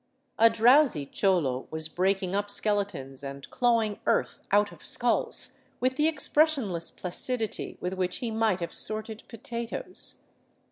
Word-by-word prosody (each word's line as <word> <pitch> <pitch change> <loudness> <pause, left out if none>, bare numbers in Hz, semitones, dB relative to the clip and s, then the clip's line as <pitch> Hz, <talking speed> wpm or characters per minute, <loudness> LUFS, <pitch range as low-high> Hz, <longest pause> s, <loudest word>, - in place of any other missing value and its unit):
A 230 +1 +7
drowsy 230 - +4
cholo 145 -7 0
was 160 0 -3
breaking 190 +2 0
up 205 0 -1
skeletons 200 -10 -1
and 140 0 -7
clawing 230 -4 +1
earth - - +1
out 205 +1 +3
of - - -15
skulls 240 -1 +1 0.3
with 255 +1 0
the 300 +2 +3
expressionless 285 - +1
placidity 220 +5 -3
with 180 +1 -2
which 185 -1 -2
he 235 -2 -4
might 220 -4 +1
have 170 - -4
sorted 215 0 0
potatoes. 235 - -1
205 Hz, 135 wpm, -27 LUFS, 180-235 Hz, 0.3 s, A